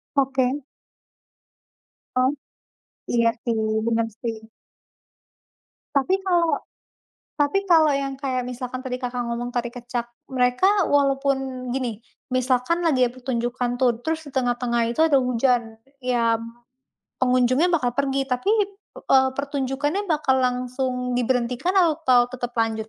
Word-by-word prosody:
Oke. 265 0 +1 1.5
Oh, 255 +1 +3 0.8
iya, 235 -1 +4
sih. 235 -2 -1 0.3
Benar, 230 0 +1
sih. 230 -2 -3 1.6
Tapi 280 +7 +3
kalau 345 -3 +2 0.7
tapi 290 +5 +1
kalau 320 -4 +5
yang 275 -1 -1
kayak 260 -3 -1
misalkan 250 +1 -5
tadi, 250 -1 -4
Kakak 245 0 -2
ngomong 235 +1 -3
tari 240 -1 -3
kecak, 245 -1 -4 0.3
mereka 265 +11 +3
walaupun 270 -2 0
gini, 245 -5 -2 0.3
misalkan 255 +6 +1
lagi 270 -6 +3
ada 245 - +3
pertunjukan, 245 -1 -2
tuh, 245 -3 +3
terus 320 0 -1
di - - -10
tengah-tengah 245 -2 0
itu 240 - -3
ada 310 -4 +5
hujan, 245 -2 +1 0.2
e 250 -1 -2
ya, 230 -1 +1 0.7
pengunjungnya 255 +5 +3
bakal 305 -9 +1
pergi, 275 +1 0
tapi, 255 +5 -2 0.5
eee, 265 0 +3
pertunjukannya 285 +7 -2
bakal 295 -5 +2
langsung 250 0 -1
diberhentikan 250 +6 0
atau 310 -9 +4
tetap 245 -1 -5
lanjut? 220 -1 0
255 Hz, 120 wpm, -23 LUFS, 245-275 Hz, 1.6 s, kalau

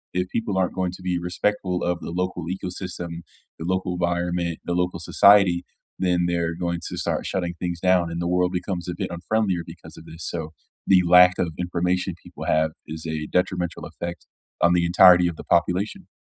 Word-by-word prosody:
if 90 0 0
people 110 -4 -2
aren't 95 -1 +1
going 95 -2 -1
to 95 - -11
be 90 -1 -1
respectful 90 +1 -1
of 85 0 0
the - - -6
local 90 -1 -2
ecosystem, 90 -2 -5 0.4
the 80 - -5
local 95 0 -1
environment, 85 -1 -1
the 85 - -1
local 90 -1 -1
society, 95 0 +5 0.4
then 90 -1 +1
they're 85 -1 -1
going 85 0 -2
to - - -6
start - - -1
shutting 90 -2 -2
things 85 -1 -3
down, 90 -1 +3
and 85 - -4
the 85 - -1
world 90 0 +1
becomes 90 -1 -3
a 90 - -3
bit - - -3
unfriendlier 95 0 0
because - - -12
of - - -12
this. 80 +1 -9
So 80 -2 -5 0.3
the 95 -2 +5
lack 90 +1 +7
of 85 -3 -1
information 90 +1 -1
people - - -9
have 80 0 +2 0.2
is 80 +1 -7
a 80 -1 -3
detrimental 90 -1 -1
effect 85 -1 -7 0.4
on 85 +1 +5
the 85 -1 +2
entirety 90 0 +7
of 85 - -3
the - - -8
population. 90 +4 0
90 Hz, 190 wpm, -24 LUFS, 85-90 Hz, 0.4 s, lack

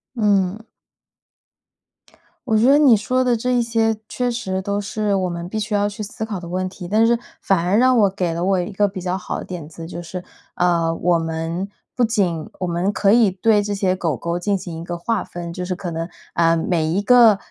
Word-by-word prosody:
嗯。 205 -2 +1 1.9
我 220 - +3
觉 220 - +3
得 275 +3 +6
你 255 -7 +6
说 255 +5 0
的 245 -2 +2
这 250 +3 -1
一 245 - +3
些 225 -1 +1
确 250 -1 -1
实 190 -6 -3
都 200 +1 -1
是 210 0 -1
我 185 -2 0
们 170 0 -5
必 215 +3 -3
须 210 0 -2
要 205 0 +2
去 205 +2 -7
思 215 +1 -5
考 210 -4 -4
的 170 -1 -9
问 185 +1 -1
题， 185 -1 -8
但 220 +4 +3
是 235 0 +3 0.2
反 190 -4 +1
而 185 +4 +2
让 255 +1 +4
我 200 -2 +5
给 180 -3 -2
了 170 +1 -2
我 190 -1 +2
一 180 +4 -3
个 205 +1 +2
比 190 -1 -6
较 180 0 -2
好 180 - -4
的 - - -7
点 170 -4 -7
子。 165 0 -9
就 170 +1 -7
是 175 +1 -7 0.3
呃 170 -2 +2
我 175 0 +2
们 165 +4 -3 0.3
不 245 - +2
仅 190 -9 0
我 185 - -1
们 175 +3 0
可 200 0 +2
以 225 -3 +5
对 205 +3 +2
这 205 0 -2
些 190 -2 +1
狗 165 -8 -1
狗 170 +7 -3
进 200 +2 0
行 165 -3 -7
一 - - -7
个 175 0 -5
划 225 +4 -1
分， 170 -1 -7
就 180 - -5
是 185 0 -2
可 180 -2 -5
能 165 +1 -4 0.2
呃 165 0 +3
每 160 -1 0
一 180 +5 0
个 230 -2 +6
190 Hz, 245 characters per minute, -21 LUFS, 175-215 Hz, 1.9 s, 得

